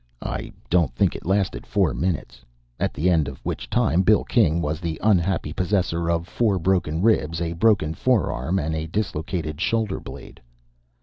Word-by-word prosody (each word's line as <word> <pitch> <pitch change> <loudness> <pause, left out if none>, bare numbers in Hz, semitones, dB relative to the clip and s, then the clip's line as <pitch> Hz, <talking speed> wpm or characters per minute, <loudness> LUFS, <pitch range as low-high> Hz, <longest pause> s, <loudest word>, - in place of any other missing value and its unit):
I - - -4 0.2
don't 85 -5 +2
think - - +2
it - - -8
lasted 95 0 0
four - - +1
minutes, 70 -9 -3 0.4
at - - 0
the 80 +6 -1
end 80 -5 +3
of 70 -2 -6
which - - -4
time 85 +7 +2
Bill 105 +2 +4
King 85 -9 +2
was 75 -1 -2
the 85 -2 -4
unhappy 95 -6 +2
possessor 90 -2 0
of 85 0 0
four 105 0 +1
broken 90 -2 0
ribs, 80 -8 +2
a 85 -1 -2
broken 85 -4 +2
forearm, 90 - 0
and 80 -2 -1
a 80 0 -3
dislocated 85 -4 -3
shoulder 105 +2 0
blade. - - -11
85 Hz, 170 wpm, -23 LUFS, 80-95 Hz, 0.4 s, Bill